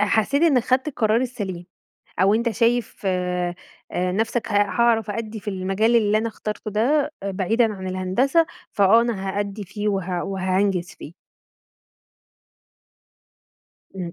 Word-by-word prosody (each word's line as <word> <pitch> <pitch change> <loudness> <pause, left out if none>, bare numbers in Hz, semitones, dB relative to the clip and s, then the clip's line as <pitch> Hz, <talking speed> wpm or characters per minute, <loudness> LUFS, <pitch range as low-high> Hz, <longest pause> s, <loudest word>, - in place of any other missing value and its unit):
حسيت 220 +8 +2
إنك 270 -8 +4
خدت 260 +4 +1
القرار 225 -4 +1
السليم، 195 -9 -4 0.5
أو 195 +3 +4
أنتَ 235 +2 +1
شايف 230 +2 0
آآ 180 -1 -1 0.4
نفسك 205 +6 -1
ه - - -3
هاعرف 225 +1 +2
أأدي 220 0 -4
في 205 - -20
المجال 195 +5 +1
اللي 215 -2 +3
أنا 225 +1 -1
اخترته 215 -1 -5
ده، 275 +8 +1
آآ، 200 - -2
بعيدًا 215 +4 +1
عن 190 -1 -7
الهندسة 195 - +1 0.3
فآه 205 +3 +5
أنا 200 -5 -2
هأدي 205 +1 -3
فيه 205 +2 -4
وه 185 -3 -1
وهانجز 190 -1 0
فيه؟ 155 - -10 2.8
امم. 175 -3 -5
210 Hz, 130 wpm, -23 LUFS, 190-230 Hz, 2.8 s, فآه